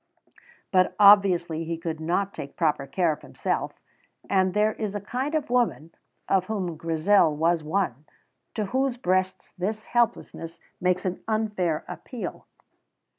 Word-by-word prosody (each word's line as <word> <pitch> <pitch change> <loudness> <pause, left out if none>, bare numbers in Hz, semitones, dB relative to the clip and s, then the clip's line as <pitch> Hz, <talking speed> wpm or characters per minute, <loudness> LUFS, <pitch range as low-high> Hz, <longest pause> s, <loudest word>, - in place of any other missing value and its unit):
But 185 -1 +3
obviously 185 -5 +5
he 165 0 -3
could 160 -1 -4
not 180 +5 -1
take 140 - -8
proper 150 -4 +1
care 175 0 +1
of 150 - -6
himself, - - -3 0.5
and 190 -1 +2
there 215 +1 +3
is 210 -2 -4
a - - -1
kind 255 +9 -3
of 295 -5 -2
woman, 235 -10 +1 0.4
of 190 -2 +2
whom 185 -5 -3
Grizel 165 +1 +3
was 165 +2 +2
one, 155 -4 -1 0.5
to 215 - -1
whose 260 +4 0
breasts 185 -3 -1
this 215 +4 -2
helplessness 170 -8 -1 0.2
makes 180 +1 +1
an 185 -1 -2
unfair 210 -7 -1
appeal. 180 +7 -7
185 Hz, 140 wpm, -26 LUFS, 165-210 Hz, 0.5 s, obviously